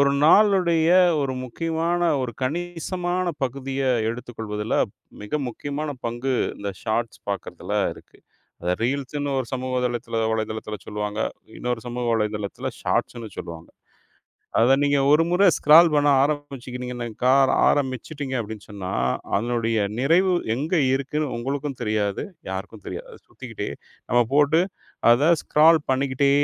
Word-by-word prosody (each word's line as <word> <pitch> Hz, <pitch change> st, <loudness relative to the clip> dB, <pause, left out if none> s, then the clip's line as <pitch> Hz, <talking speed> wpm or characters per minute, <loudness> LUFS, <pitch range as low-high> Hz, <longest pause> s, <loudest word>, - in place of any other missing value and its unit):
ஒரு 140 Hz, 0 st, +5 dB
நாளுடைய 170 Hz, -3 st, +5 dB, 0.3 s
ஒரு 135 Hz, -1 st, -1 dB
முக்கியமான 165 Hz, +6 st, -1 dB, 0.2 s
ஒரு 120 Hz, -2 st, -3 dB
கணிசமான 175 Hz, +4 st, -2 dB, 0.2 s
பகுதிய 135 Hz, +1 st, -4 dB, 0.3 s
எடுத்துக்கொள்வதுல 110 Hz, -3 st, -4 dB, 0.5 s
மிக 105 Hz, +9 st, -2 dB
முக்கியமான 145 Hz, +5 st, -4 dB, 0.2 s
பங்கு 120 Hz, +3 st, -2 dB, 0.2 s
இந்த 100 Hz, -1 st, -4 dB
ஷார்ட்ஸ் 115 Hz, +1 st, -2 dB
பாக்கிறதுல 100 Hz, -3 st, -5 dB, 0.2 s
இருக்கு. -, -, -18 dB, 0.6 s
ரீல்ஸ்ன்னு 140 Hz, +4 st, -2 dB
ஒரு 130 Hz, -, -2 dB
சமூக 130 Hz, 0 st, -2 dB
தளத்துல, 120 Hz, -2 st, -3 dB
வலைத்தளத்துல 110 Hz, -1 st, -3 dB
சொல்லுவாங்க. 105 Hz, 0 st, -3 dB, 0.4 s
இன்னொரு 125 Hz, -2 st, -2 dB
சமூக 120 Hz, 0 st, -4 dB
வலைத்தளத்துல 105 Hz, -2 st, -2 dB
ஷார்ட்ஸ்ன்னு 115 Hz, -2 st, -1 dB
சொல்லுவாங்க. 85 Hz, -1 st, -8 dB, 0.9 s
அத 125 Hz, +4 st, +5 dB
நீங்க 145 Hz, 0 st, +3 dB
ஒரு 150 Hz, +2 st, +6 dB
முற 180 Hz, +3 st, +2 dB
ஸ்கரால் 160 Hz, +3 st, +7 dB
பண்ண 145 Hz, 0 st, +3 dB
ஆரம்பிச்சீங்கன்னாக்கா 125 Hz, -4 st, -2 dB, 0.3 s
ஆரம்பிச்சுட்டீங்க 135 Hz, +1 st, -1 dB
அப்படின்னு 110 Hz, -1 st, -7 dB
சொன்னா 100 Hz, -3 st, -6 dB, 0.5 s
அதனுடைய 115 Hz, +1 st, 0 dB, 0.2 s
நிறைவு 170 Hz, +8 st, +3 dB, 0.2 s
எங்க 150 Hz, +8 st, -2 dB, 0.2 s
இருக்குன்னு 140 Hz, +1 st, -2 dB
உங்களுக்கும் 135 Hz, +3 st, -3 dB
தெரியாது, 105 Hz, -3 st, -1 dB, 0.3 s
யாருக்கும் 95 Hz, +2 st, -6 dB
தெரியாது. -, -, -6 dB
அது -, -, -14 dB
சுத்திக்கிட்டே, -, -, -6 dB, 0.4 s
நம்ம 120 Hz, +1 st, +4 dB
போட்டு 150 Hz, +3 st, +4 dB, 0.5 s
அத 130 Hz, +7 st, +5 dB
ஸ்கரால் 160 Hz, +2 st, +5 dB
பண்ணிக்கிட்டே 135 Hz, +1 st, +2 dB
130 Hz, 115 wpm, -24 LUFS, 115-150 Hz, 0.9 s, ஸ்கரால்